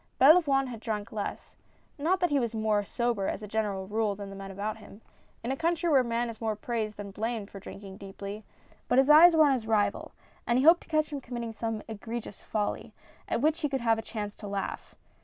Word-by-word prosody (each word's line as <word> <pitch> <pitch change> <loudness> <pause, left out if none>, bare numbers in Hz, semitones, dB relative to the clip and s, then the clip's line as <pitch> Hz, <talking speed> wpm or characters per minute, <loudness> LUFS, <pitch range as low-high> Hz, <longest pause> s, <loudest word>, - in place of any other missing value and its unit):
Belavoine 280 -2 +6
had 235 -3 -7
drank 210 -2 -4
less; 210 -2 -5 0.4
not 350 +6 +2
that 355 - +2
he 285 - +3
was 235 -2 -2
more 215 -1 +1
sober 235 -1 -1
as 215 - -3
a - - -6
general 205 -3 -2
rule 210 0 0
than 200 0 -8
the - - -8
men 195 0 -8
about 205 +3 -4
him 210 -1 -14 0.2
— - - -35
in 240 - -2
a - - 0
country 335 +3 0
where 275 - +6
a - - +3
man 235 0 -1
is 230 -1 -8
more 220 -1 0
praised 215 -1 -3
than 200 -1 -7
blamed 220 0 -3
for 200 - -8
drinking 195 0 -10
deeply 200 +2 -8 0.2
— - - -30
but 245 - +2
his 270 +2 +6
eyes 330 +3 +9
were 315 -1 +7
on 280 - +4
his 235 -4 -3
rival, 215 -2 +1 0.4
and 235 - +3
he 260 - +2
hoped 335 +2 +7
to - - -18
catch 310 -1 +1
him 285 -2 -4
committing 235 -2 -5
some 225 -1 -3
egre 225 +2 -5
gious 210 - -11
folly, 210 -1 -3 0.3
at - - -1
which 310 +3 +2
he 295 - 0
could 270 -2 -2
have 225 -1 +2
a - - -2
chance 210 -2 -5
to 210 - -9
laugh. 200 -1 -4
225 Hz, 245 wpm, -29 LUFS, 205-270 Hz, 0.4 s, eyes